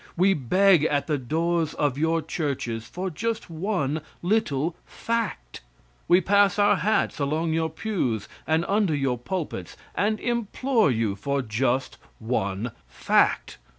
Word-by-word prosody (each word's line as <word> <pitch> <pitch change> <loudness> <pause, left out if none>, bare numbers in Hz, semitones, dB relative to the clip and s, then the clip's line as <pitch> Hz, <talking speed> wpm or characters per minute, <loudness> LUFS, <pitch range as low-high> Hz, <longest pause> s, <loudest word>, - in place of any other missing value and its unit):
We 190 +3 +4
beg 180 +4 +4
at 145 -2 +1
the 150 -3 -1
doors 160 +4 0
of 145 -3 0
your 160 +2 +1
churches 135 -8 -3
for 185 +6 -4
just 220 +3 -3
one 160 -4 -1 0.2
little 170 -6 0
fact. 225 - -4 0.5
We 175 - +6
pass 200 +2 +3
our 205 0 +4
hats 215 -5 0
along 155 +3 0
your 160 0 0
pews 155 - -2 0.2
and 160 +2 +2
under 200 -6 +2
your 135 -4 0
pulpits 135 - -5 0.2
and 215 +2 0
implore 235 - +1
you 110 -5 0
for 140 +6 -2
just 125 +3 -1 0.2
one 110 -1 -2 0.2
fact. - - +1
160 Hz, 135 wpm, -25 LUFS, 130-195 Hz, 0.5 s, We